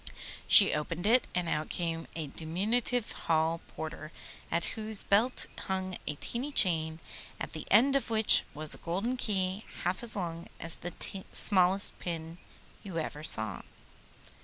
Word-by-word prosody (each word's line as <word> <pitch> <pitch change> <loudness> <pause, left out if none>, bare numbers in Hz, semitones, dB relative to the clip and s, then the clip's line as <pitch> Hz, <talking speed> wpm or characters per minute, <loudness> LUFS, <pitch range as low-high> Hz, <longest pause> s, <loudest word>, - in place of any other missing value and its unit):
She 200 - +10
opened 165 +4 -3
it, 240 +4 +3
and 180 -1 -1
out 155 -1 -2
came 165 -2 -3
a 160 -2 -3
diminutive 205 - -2
hall 165 0 0
porter 155 0 -7 0.4
at 170 0 0
whose 220 -1 0
belt 225 +6 +3 0.2
hung 190 -1 -3
a 150 - -2
tiny 245 - -4
chain, 160 - 0 0.4
at - - -5
the 155 - -7
end 260 +7 +5
of 275 - 0
which 220 -1 +5
was 155 0 -1
a - - -6
golden 195 +9 -2
key 195 -4 -1 0.2
half 180 +1 -1
as 235 -2 -4
long 170 -3 -5
as 165 0 +1
the 180 +2 0
smallest 190 0 +2
pin 165 -1 -6 0.4
you 190 -4 -7
ever 155 -1 -4
saw. 110 -8 +2
180 Hz, 150 wpm, -30 LUFS, 160-210 Hz, 0.4 s, She